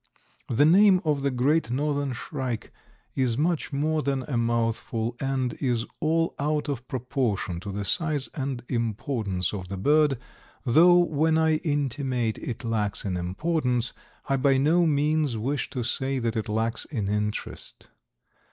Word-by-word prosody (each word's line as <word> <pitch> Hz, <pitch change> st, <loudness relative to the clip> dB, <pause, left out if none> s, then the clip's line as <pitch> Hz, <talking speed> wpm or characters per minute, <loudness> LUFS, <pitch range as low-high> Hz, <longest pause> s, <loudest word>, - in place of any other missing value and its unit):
The 125 Hz, +5 st, +4 dB
name 190 Hz, +3 st, +6 dB
of 150 Hz, -2 st, +1 dB
the 140 Hz, -, +1 dB
Great 135 Hz, +3 st, +1 dB
Northern 140 Hz, +1 st, -1 dB
Shrike 125 Hz, -2 st, -5 dB, 0.4 s
is 125 Hz, -3 st, 0 dB
much 160 Hz, +2 st, 0 dB
more 155 Hz, +2 st, 0 dB
than 135 Hz, -2 st, -1 dB
a 135 Hz, -, -4 dB
mouthful, 115 Hz, 0 st, -1 dB
and 135 Hz, -2 st, -1 dB
is 120 Hz, -4 st, 0 dB
all 165 Hz, +1 st, +1 dB
out 150 Hz, +1 st, 0 dB
of 130 Hz, -3 st, -4 dB
proportion 120 Hz, -8 st, -2 dB
to 100 Hz, +3 st, -6 dB
the 100 Hz, +1 st, -4 dB
size 150 Hz, -, +2 dB
and 135 Hz, -4 st, -3 dB
importance 110 Hz, -5 st, -2 dB
of 95 Hz, -3 st, -5 dB
the 95 Hz, +1 st, -5 dB
bird, 145 Hz, +5 st, +3 dB, 0.5 s
though 170 Hz, +8 st, +6 dB
when 160 Hz, -2 st, +2 dB
I 160 Hz, -1 st, +3 dB
intimate 135 Hz, -6 st, -1 dB
it 120 Hz, +1 st, -5 dB
lacks 110 Hz, -4 st, -1 dB
in 95 Hz, -2 st, -1 dB
importance 125 Hz, -, -1 dB, 0.3 s
I 135 Hz, -, +2 dB
by 135 Hz, 0 st, +3 dB
no 165 Hz, +5 st, +3 dB
means 150 Hz, -3 st, +1 dB
wish 135 Hz, +6 st, -2 dB
to 125 Hz, -, -3 dB
say 135 Hz, +3 st, -1 dB
that 115 Hz, -2 st, -1 dB
it 110 Hz, 0 st, -2 dB
lacks 110 Hz, +2 st, -1 dB
in 110 Hz, -9 st, -3 dB
interest. 105 Hz, +1 st, -4 dB
130 Hz, 150 wpm, -26 LUFS, 115-150 Hz, 0.5 s, name